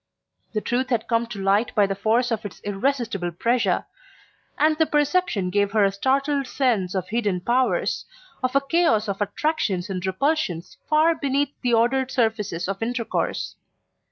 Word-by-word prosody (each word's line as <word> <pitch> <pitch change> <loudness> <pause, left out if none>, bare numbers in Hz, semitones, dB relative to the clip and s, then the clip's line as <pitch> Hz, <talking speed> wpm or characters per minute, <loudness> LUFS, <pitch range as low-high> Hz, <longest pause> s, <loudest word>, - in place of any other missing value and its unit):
The 215 - -1
truth 250 +3 -1
had 235 -3 0
come 230 0 +1
to 220 -4 -7
light 200 +4 +1
by 205 - +5
the 195 - -1
force 225 +5 +1
of 225 -1 -1
its 205 - -8
irresistible 205 -3 -1
pressure; 235 +8 +1 0.7
and 310 +1 +3
the 320 0 +2
perception 295 - +1
gave 205 +1 +1
her 215 -2 +4
a 195 - +2
startled 275 +6 0
sense 225 -9 0
of 185 -1 -2
hidden 210 -5 0
powers, 245 +7 0 0.4
of 255 0 -1
a 275 - +5
chaos 275 -7 +2
of 200 0 -3
attractions 205 - -1
and 185 -2 -3
repulsions 190 - -1
far 310 +2 +4
beneath 280 -2 0
the 245 -2 +2
ordered 255 +3 +2
surfaces 220 -9 -1
of 195 +1 -4
intercourse. 235 0 -2
230 Hz, 160 wpm, -24 LUFS, 200-275 Hz, 0.7 s, by